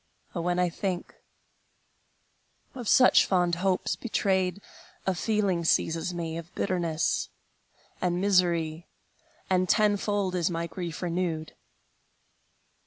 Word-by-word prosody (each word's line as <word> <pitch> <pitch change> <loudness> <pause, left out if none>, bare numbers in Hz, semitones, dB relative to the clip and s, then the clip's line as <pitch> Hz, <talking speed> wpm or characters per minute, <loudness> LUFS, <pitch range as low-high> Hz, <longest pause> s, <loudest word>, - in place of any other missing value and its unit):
Oh, 170 - -2
when 175 +1 0
I 180 0 +3
think 180 +1 -4 1.6
of 245 -4 -7
such 255 - +6
fond 180 -2 +2
hopes 190 -1 +1
betrayed, 190 -4 0 0.5
A 190 - +2
feeling 195 -2 0
seizes 165 +1 +1
me 165 -2 -4
Of 170 +1 -11
bitterness 170 -4 0 0.7
and 180 -1 0
misery, 175 -4 +1 0.6
And 185 -1 +1
tenfold 205 -2 +2
is 175 -2 +1
my 170 -1 -2
grief 170 0 -6
renewed! 170 -3 -2
180 Hz, 105 wpm, -27 LUFS, 170-190 Hz, 1.6 s, such